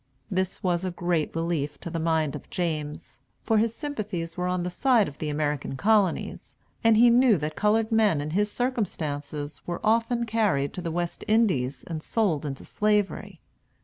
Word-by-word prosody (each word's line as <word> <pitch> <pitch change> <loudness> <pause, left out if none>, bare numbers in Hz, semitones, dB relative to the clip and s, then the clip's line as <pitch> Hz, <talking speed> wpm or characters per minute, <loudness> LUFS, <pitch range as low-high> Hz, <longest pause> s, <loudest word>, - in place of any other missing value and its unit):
This 185 -1 -1
was 175 -1 +1
a 185 - -1
great 175 -3 -1
relief 165 -3 -1
to 170 - -6
the 165 - -2
mind 160 -3 +1
of - - -9
James; 155 -4 -4 0.2
for 220 -1 +3
his 230 +1 +1
sympathies 210 - -4
were 180 0 -2
on 180 -1 -1
the 180 - -3
side 235 +2 +3
of 145 - -10
the 155 - -2
American 145 -2 -2
Colonies, 205 0 +1 0.3
and 225 -1 +5
he 240 +1 +7
knew 240 -3 +5
that 150 0 -4
colored 215 +2 +2
men 215 -8 +3
in 150 +1 -3
his 205 +4 +1
circumstances 150 - -3
were 175 -1 -3
often 230 +2 +2
carried 210 -12 +1
to 180 - -5
the 170 - -3
West 175 +1 -3
Indies 155 - +1
and 160 -2 -5
sold 165 -8 0
into 135 -1 -6
Slavery. 210 -1 -1
180 Hz, 180 wpm, -26 LUFS, 155-215 Hz, 0.3 s, he